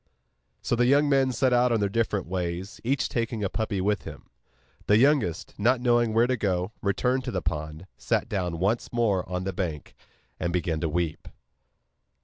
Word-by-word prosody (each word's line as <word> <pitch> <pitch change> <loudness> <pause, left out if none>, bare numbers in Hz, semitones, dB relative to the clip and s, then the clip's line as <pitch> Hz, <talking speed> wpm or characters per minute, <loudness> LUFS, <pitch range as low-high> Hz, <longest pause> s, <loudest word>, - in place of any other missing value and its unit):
So - - +1
the 120 +1 +3
young 145 +3 +4
men 135 -2 +3
set 130 +1 +1
out 125 0 +3
on 115 - +2
their 100 - +1
different 105 -2 -1
ways, 90 +1 -4
each 135 +4 0
taking 115 -2 -2
a 100 - 0
puppy 110 -3 -2
with 100 +2 0
him. - - -11 0.6
The 105 - +5
youngest, 125 - +2
not 120 +5 +3
knowing 120 -2 +2
where 115 +2 +4
to 130 +1 +1
go, 95 -3 -1
returned 125 +6 0
to 125 - -3
the 95 -4 -3
pond, 75 +3 -4
sat - - 0
down 90 -4 -2
once 100 +7 0
more 105 -7 0
on 90 0 -2
the 95 0 -3
bank, 80 -5 -4 0.5
and 85 - -1
began 85 -2 -1
to 80 - -1
weep. 85 0 -2
105 Hz, 185 wpm, -26 LUFS, 90-120 Hz, 0.6 s, The